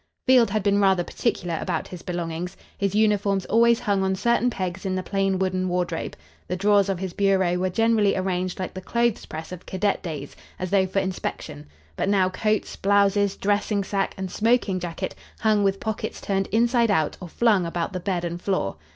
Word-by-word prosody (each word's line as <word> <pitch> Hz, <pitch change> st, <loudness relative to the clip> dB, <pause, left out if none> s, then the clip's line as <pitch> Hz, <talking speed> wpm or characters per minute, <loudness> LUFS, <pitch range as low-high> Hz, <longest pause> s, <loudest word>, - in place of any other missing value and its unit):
Field 255 Hz, -3 st, +5 dB
had 215 Hz, -2 st, -1 dB
been 200 Hz, 0 st, +3 dB
rather 190 Hz, -2 st, +3 dB
particular 175 Hz, -5 st, -2 dB
about -, -, -2 dB
his 180 Hz, -2 st, -8 dB
belongings. 175 Hz, +1 st, -4 dB, 0.2 s
His 200 Hz, 0 st, -1 dB
uniforms 205 Hz, -3 st, +2 dB
always 235 Hz, +1 st, +4 dB
hung 200 Hz, -2 st, +1 dB
on 190 Hz, 0 st, +1 dB
certain 235 Hz, +4 st, +2 dB
pegs 185 Hz, -4 st, -4 dB
in 190 Hz, -2 st, -1 dB
the 185 Hz, -, -2 dB
plain 195 Hz, -1 st, 0 dB
wooden 185 Hz, 0 st, 0 dB
wardrobe. 180 Hz, -2 st, -2 dB, 0.3 s
The 180 Hz, -, -2 dB
drawers 200 Hz, +1 st, +3 dB
of 195 Hz, -, 0 dB
his 185 Hz, -1 st, -5 dB
bureau 190 Hz, -3 st, +2 dB
were 185 Hz, +1 st, 0 dB
generally 225 Hz, 0 st, +2 dB
arranged 185 Hz, -1 st, -1 dB
like 185 Hz, -, -4 dB
the 185 Hz, -, -6 dB
clothes 235 Hz, +2 st, 0 dB
press 160 Hz, +2 st, -7 dB
of 180 Hz, -1 st, -9 dB
cadet 195 Hz, +2 st, 0 dB
days, 150 Hz, -5 st, -6 dB, 0.2 s
as 185 Hz, -1 st, -4 dB
though 190 Hz, -2 st, +3 dB
for 190 Hz, -, -5 dB
inspection, 185 Hz, -, -3 dB, 0.3 s
but -, -, 0 dB
now 190 Hz, -2 st, +3 dB
coats, 215 Hz, +3 st, -1 dB
blouses, 200 Hz, 0 st, +2 dB
dressingsack 205 Hz, -1 st, 0 dB
and 190 Hz, -1 st, -4 dB
smoking 220 Hz, -4 st, +1 dB
jacket 170 Hz, -2 st, -4 dB, 0.3 s
hung 215 Hz, -2 st, +3 dB
with 195 Hz, 0 st, +1 dB
pockets 220 Hz, -2 st, -4 dB
turned 195 Hz, -1 st, -1 dB
inside 235 Hz, +1 st, +2 dB
out 160 Hz, -7 st, +1 dB
or 180 Hz, -, -6 dB
flung 205 Hz, -4 st, +2 dB
about 170 Hz, +3 st, -3 dB
the 185 Hz, -, -2 dB
bed 180 Hz, -1 st, -2 dB
and 170 Hz, +1 st, -4 dB
floor. 185 Hz, -, -1 dB
195 Hz, 190 wpm, -24 LUFS, 180-205 Hz, 0.3 s, Field